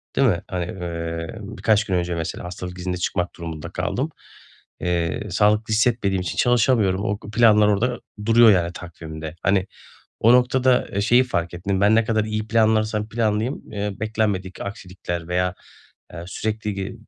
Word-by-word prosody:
değil 135 - +4
mi? 90 -6 +1
Hani, 90 -2 -3
eee, 85 -3 -5
birkaç 110 -1 +1
gün 95 - -1
önce 90 -1 -1
mesela 80 +1 -4
hastalık 90 0 -7
iznine 90 0 -3
çıkmak 90 0 -2
durumunda 80 -3 -6
kaldım. - - -2 0.7
Eee, 85 +3 -1
sağlıklı 105 +3 +2
hissetmediğim 110 -4 +2
için 90 - -4
çalışamıyorum. 115 -6 +3
O 105 -1 -1
planlar 105 -1 +4
orada 120 +4 +1 0.3
duruyor, 115 0 +7
yani, 90 -2 +1
takvimde. 80 -2 -8
Hani, 95 0 +2 0.5
o 115 +2 +6
noktada, 125 0 +3
eee, 100 - -2
şeyi 120 +5 +5
fark 85 -9 -2
ettim, 95 +2 -2
ben, 105 +2 +5
ne 115 - +4
kadar 110 -2 +1
iyi 110 0 -3
planlarsam 110 -1 +2
planlayayım, 110 +2 -1
eee, 105 -1 -2
beklenmedik 105 -4 -2
aksilikler 90 -4 -6
veya, 90 0 0 0.6
eee, 85 -1 -7
sürekli 105 +2 -3
ge 95 +1 -4
100 Hz, 155 wpm, -22 LUFS, 90-110 Hz, 0.7 s, duruyor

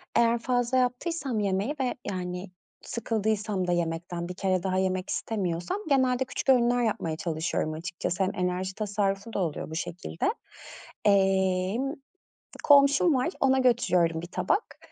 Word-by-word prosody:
Eğer 235 0 +4
fazla 245 +1 +1
yaptıysam 255 0 -1
yemeği 200 +8 0
ve, 255 -2 0
yani, 180 0 -4 0.3
sıkıldıysam 215 -4 -1
da - - +1
yemekten 170 0 -2
bir - - -4
kere 185 -1 0
daha 185 -1 0
yemek 185 0 0
istemiyorsam 180 - -2
genelde 260 -1 +3
küçük 265 - -4
öğünler 245 -1 +4
yapmaya 165 -8 -1
çalışıyorum 160 -1 -2
açıkçası. 175 +3 -3
Hem 185 - 0
enerji 185 +1 -2
tasarrufu 205 0 -2
da - - -1
oluyor 165 -5 -2
bu 160 - -6
şekilde. 165 - -2 0.7
Emm, 195 +5 +2 0.7
komşum 285 +3 +6
var, 255 +4 +1
ona 265 -1 +3
götürüyorum 180 -10 +2
1 175 - -7
tabak. 185 - -1
195 Hz, 135 wpm, -27 LUFS, 180-245 Hz, 0.7 s, komşum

